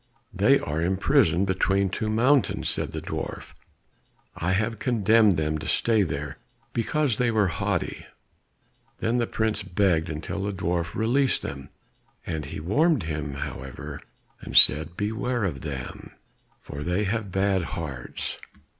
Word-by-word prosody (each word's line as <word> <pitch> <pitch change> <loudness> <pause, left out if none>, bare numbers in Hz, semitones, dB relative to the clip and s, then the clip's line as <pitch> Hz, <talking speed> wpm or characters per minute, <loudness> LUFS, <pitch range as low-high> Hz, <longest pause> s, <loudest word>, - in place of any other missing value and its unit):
"They - - +5
are 75 +2 -3
imprisoned 95 - +3
between 95 +1 +1
two 110 +3 -2
mountains," 125 +5 +2
said - - -2
the - - -5
dwarf. - - -5 0.8
"I 90 +3 0
have 110 +2 0
condemned 110 -4 +4
them 75 0 -1
to 80 - -6
stay 115 -2 +3
there, 75 -4 -3 0.3
because 120 +1 0
they 125 -1 +2
were 110 -3 +3
so - - -4
haughty." 100 -3 -2 0.9
Then 120 +2 +1
the 120 - 0
prince 110 -1 0
begged 90 -4 +1
until 80 +5 -4
the 100 +1 -2
dwarf 85 -2 -2
released 130 +4 +2
them; 70 0 -6 0.6
but 80 -3 -3
he 70 - -6
warned 145 - +2
him, 75 -3 -4
however, 65 -1 -6 0.4
and - - -1
said, 80 +5 +6
"Beware 110 +3 -1
of 75 -9 -2
them, 70 -4 -7 0.5
for 70 - -8
they 90 +6 0
have 105 -1 -2
bad 95 0 +2 0.2
hearts." 70 -7 -5
95 Hz, 145 wpm, -26 LUFS, 80-110 Hz, 0.9 s, said